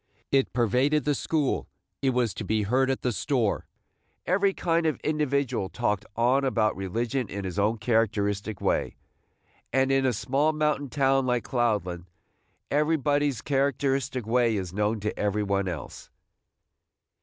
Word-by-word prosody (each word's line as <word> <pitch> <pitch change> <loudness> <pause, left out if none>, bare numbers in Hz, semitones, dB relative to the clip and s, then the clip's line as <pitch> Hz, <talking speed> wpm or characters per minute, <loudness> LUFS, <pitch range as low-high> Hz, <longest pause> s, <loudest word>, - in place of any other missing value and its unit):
It 135 -1 +2
pervaded 125 +6 +2
the 145 - +2
school; 150 0 -1 0.3
it 135 - +2
was 125 -5 +1
to 105 - -5
be 110 +1 0
heard 130 +6 +2
at 135 - -1
the 125 - +1
store. 115 - 0 0.6
Every 195 +2 +2
kind 170 -3 0
of 155 - -1
individual 140 -9 0
talked 105 +5 -1
on 120 +3 +3
and 140 -1 +1
about 110 -4 +1
religion 115 +5 -2
in 100 +1 -5
his 95 +2 -3
own 105 +3 +2
characteristic 110 -2 0
way, - - 0 0.8
and 135 0 +2
in 135 -1 +3
a - - +3
small 140 +8 +1
mountain 150 -2 0
town 135 0 +2
like 125 -2 +1
Cloudland 105 -8 -1 0.7
everybody's 145 -3 +1
characteristic 135 -3 0
way 115 0 +2
is 90 -3 -4
known 105 +2 0
to 105 - -2
every 105 0 0
one 100 -1 0
else. 85 -6 -6
125 Hz, 150 wpm, -27 LUFS, 105-140 Hz, 0.8 s, on